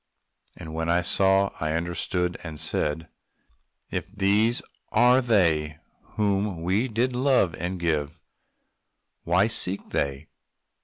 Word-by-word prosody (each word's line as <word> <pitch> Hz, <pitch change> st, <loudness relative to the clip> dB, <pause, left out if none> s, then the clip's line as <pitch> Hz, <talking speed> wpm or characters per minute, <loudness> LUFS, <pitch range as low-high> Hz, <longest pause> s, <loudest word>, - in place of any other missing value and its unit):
And 80 Hz, -1 st, -9 dB
when 80 Hz, +1 st, -2 dB
I 90 Hz, +1 st, +2 dB
saw, 95 Hz, +2 st, +3 dB
I 80 Hz, 0 st, -1 dB
understood 85 Hz, +1 st, -2 dB
and 80 Hz, -3 st, -8 dB
said 75 Hz, +3 st, -1 dB, 0.8 s
"If -, -, -4 dB
these 105 Hz, +3 st, +2 dB, 0.3 s
are 125 Hz, +3 st, +5 dB
they 80 Hz, -, +1 dB, 0.4 s
whom 100 Hz, -4 st, 0 dB
we 100 Hz, +8 st, +1 dB
did 120 Hz, +2 st, -1 dB
love, 125 Hz, -, +2 dB
and 90 Hz, +2 st, -4 dB
give, 80 Hz, -1 st, -2 dB, 1.1 s
What 95 Hz, +6 st, +2 dB
seek 95 Hz, -2 st, 0 dB
they?" 70 Hz, +1 st, -2 dB
90 Hz, 115 wpm, -25 LUFS, 80-105 Hz, 1.1 s, are